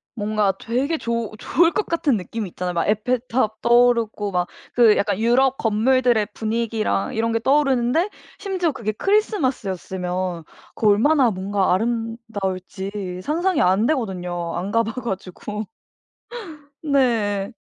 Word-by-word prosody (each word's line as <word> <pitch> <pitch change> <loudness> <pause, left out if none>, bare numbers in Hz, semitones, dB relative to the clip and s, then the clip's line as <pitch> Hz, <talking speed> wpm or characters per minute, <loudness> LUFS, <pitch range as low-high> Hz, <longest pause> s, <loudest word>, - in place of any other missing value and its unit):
뭔가 210 -2 +1
되게 265 +8 -1
좋 235 -5 -2
좋을 335 +9 +2
것 420 - -1
같은 305 -7 +1
느낌이 205 +2 -5
있잖아요. 180 +1 -4
막 170 - 0
에펠탑 225 +1 0
떠오르고 235 -4 +3
막 180 -1 0 0.3
그 230 -3 +5
약간 200 -1 0
유럽 255 +4 +3
건물들의 230 0 +2
분위기랑 225 +1 -1
이런 230 0 0
게 230 - +1
떠오르는데 275 - +2 0.3
심지어 370 -5 -1
그게 230 -6 -3
크리스마스였으면 190 - -1 0.3
그 220 - +1
얼마나 250 +6 +4
뭔가 190 0 0
아름다울지 200 -4 -3
상상이 345 - +1
안 190 +5 +3
되거든요 180 - -2
안 185 +3 -3
가 230 +1 +3
봐 225 0 -4
가지고. 210 0 -5 1.2
네. 230 -9 +1
225 Hz, 290 characters per minute, -22 LUFS, 195-255 Hz, 1.2 s, 그